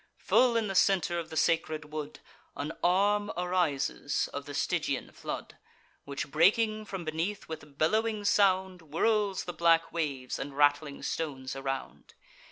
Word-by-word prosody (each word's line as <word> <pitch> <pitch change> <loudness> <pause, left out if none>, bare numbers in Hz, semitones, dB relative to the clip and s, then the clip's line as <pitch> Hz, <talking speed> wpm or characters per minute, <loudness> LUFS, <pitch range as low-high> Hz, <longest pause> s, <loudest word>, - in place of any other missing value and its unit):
Full 245 -2 +3
in 225 -2 0
the 195 - -3
centre 180 -3 +3
of 165 -1 -6
the 160 - -6
sacred 155 -2 0
wood 150 -1 -5 0.3
An 145 +2 -3
arm 205 +3 +3
arises 175 -6 0
of - - -5
the - - -6
Stygian - - -1
flood, - - -6 0.5
Which, 140 0 -5
breaking 215 +6 +3
from 195 -4 -6
beneath 165 +6 -3
with 145 -3 -9
bellowing 215 +6 +1
sound, 190 -3 +3
Whirls 195 +6 +1
the 175 - -5
black 165 0 +3
waves 140 -6 -2
and 140 0 -6
rattling 145 0 +2
stones 135 -5 -3
around. 135 0 -5
165 Hz, 145 wpm, -30 LUFS, 150-195 Hz, 0.5 s, Full